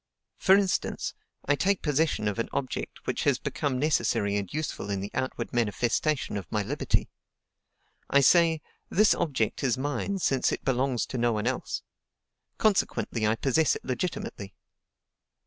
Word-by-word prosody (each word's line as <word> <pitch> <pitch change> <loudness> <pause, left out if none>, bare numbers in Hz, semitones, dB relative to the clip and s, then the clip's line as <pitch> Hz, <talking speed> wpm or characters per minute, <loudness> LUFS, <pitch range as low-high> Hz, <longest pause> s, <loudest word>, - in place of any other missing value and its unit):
For 190 - +6
instance, 195 -2 0 0.3
I 145 - +3
take 190 +6 +1
possession 150 -6 +1
of 105 +2 -2
an 115 - -1
object 130 -2 -4
which - - -1
has - - +3
become 140 -3 -2
necessary 115 -8 +1
and 100 -3 -2
useful 155 -8 -3
in 100 -1 -1
the 100 +2 -5
outward 130 -2 -3
manifestation 120 +3 0
of 95 -5 -7
my 105 -1 0
liberty. - - 0 1.0
I 140 - +5
say, 165 +2 +5 0.3
'This 210 +2 +5
object 140 -7 -1
is 125 -3 +2
mine 145 +8 -2
since 135 -8 +1
it - - -4
belongs 130 -1 +1
to 130 - -4
no 120 0 +2
one 105 0 -2
else; 130 +1 -2 0.7
consequently, 185 - +1
I 110 - +2
possess 140 +6 +2
it - - -8
legitimately.' 125 - -4
130 Hz, 150 wpm, -28 LUFS, 115-155 Hz, 1.0 s, For